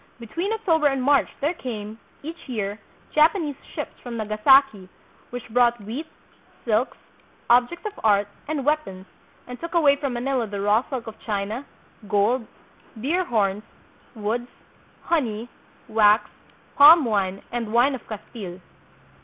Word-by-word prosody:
Between 335 - -3
October 335 -9 +2
and 270 -2 0
March 280 +1 +3
there 300 +5 +1
came, 220 -7 -6 0.2
each 325 -1 -9
year, 210 -3 -3 0.3
Japanese 310 -1 +3 0.2
ships - - -4
from 240 -2 -6
Nagasaki 215 -1 +3 0.4
which 245 -1 -7
brought 240 +1 +3
wheat, 235 +10 -6 0.6
silks, 230 +3 0 0.5
objects 250 - +3
of 420 -1 -5
art, 205 -2 +3 0.2
and 295 -3 -2
weapons, 290 -12 -1 0.4
and 250 0 -9
took 335 +1 -6
away 295 -4 +5
from 275 -3 -3
Manila 245 -1 -1
the 200 -1 -5
raw 205 +3 +3
silk 255 -4 -4
of 220 - -9
China, 215 +5 -3 0.4
gold, 215 +3 +1 0.5
deer 340 +10 0
horns, 205 - 0 0.5
woods, 230 +3 -2 0.5
honey, 240 -8 -1 0.4
wax, 215 0 +4 0.5
palm 300 +1 +9
wine, 195 -4 -1
and 235 -3 -3
wine 245 +5 +4
of 260 - -8
Castile. 205 -4 -8
240 Hz, 135 wpm, -24 LUFS, 215-285 Hz, 0.6 s, palm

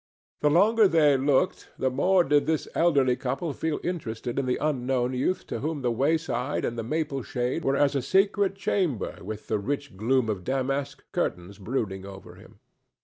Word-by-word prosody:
The 150 - +3
longer 210 +7 +5
they 155 -5 +4
looked, 140 +6 +1
the 130 - 0
more 180 +8 +3
did 145 -2 +2
this 160 -1 0
elderly 140 -7 +3
couple 135 +5 -3
feel 160 +2 -2
interested 125 -8 -3
in 135 - -2
the 125 - +1
unknown 130 -3 0
youth 130 +9 -1
to - - -4
whom 150 -2 -3
the 120 - +1
wayside 140 0 0
and 120 - -2
the 115 - -3
maple 145 +2 -2
shade 125 +7 -2
were 135 0 +1
as 145 0 +3
a 140 - 0
secret 195 +6 +2
chamber 185 - -1
with 105 +2 -7
the 110 - -1
rich 140 +4 -4
gloom 120 +4 +1
of 100 -4 -3
damask 135 +2 -2
curtains 90 +3 -3
brooding 100 -3 -3
over 95 0 -10
him. - - -17
135 Hz, 180 wpm, -26 LUFS, 120-155 Hz, -, longer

